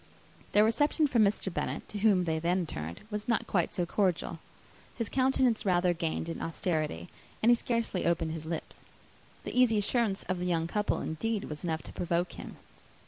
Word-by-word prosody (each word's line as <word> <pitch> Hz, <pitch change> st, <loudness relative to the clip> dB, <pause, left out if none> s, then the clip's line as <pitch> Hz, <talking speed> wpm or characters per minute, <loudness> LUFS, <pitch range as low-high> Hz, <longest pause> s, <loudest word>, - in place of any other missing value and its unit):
Their 210 Hz, -, +6 dB
reception 290 Hz, +8 st, +3 dB
from 240 Hz, -6 st, +4 dB
Mr. 200 Hz, -2 st, +1 dB
Bennet, -, -, -3 dB
to 210 Hz, -, -4 dB
whom 200 Hz, -3 st, +4 dB
they 160 Hz, -2 st, 0 dB
then 175 Hz, +2 st, +1 dB
turned, 80 Hz, -, -6 dB
was 210 Hz, 0 st, -3 dB
not 230 Hz, -2 st, +1 dB
quite 175 Hz, -4 st, +1 dB
so 175 Hz, -, -1 dB
cordial. 175 Hz, -3 st, 0 dB, 0.6 s
His 230 Hz, -3 st, -3 dB
countenance 260 Hz, -3 st, +2 dB
rather 180 Hz, -2 st, +3 dB
gained 165 Hz, -1 st, -2 dB
in 165 Hz, -, -5 dB
austerity; 155 Hz, -, -2 dB, 0.4 s
and 235 Hz, -, +7 dB
he -, -, +7 dB
scarcely 230 Hz, -7 st, -1 dB
opened 165 Hz, -2 st, +1 dB
his 160 Hz, -1 st, -6 dB
lips. 165 Hz, -1 st, -5 dB, 0.6 s
The -, -, -6 dB
easy 250 Hz, -3 st, +5 dB
assurance 205 Hz, -1 st, +1 dB
of 185 Hz, -1 st, -2 dB
the 180 Hz, -, -2 dB
young 165 Hz, -2 st, +1 dB
couple, 210 Hz, +5 st, 0 dB
indeed, 215 Hz, +6 st, -2 dB
was 150 Hz, -1 st, -6 dB
enough 160 Hz, -2 st, -2 dB
to -, -, -10 dB
provoke 175 Hz, 0 st, -1 dB
him. -, -, -9 dB
185 Hz, 185 wpm, -30 LUFS, 165-220 Hz, 0.6 s, and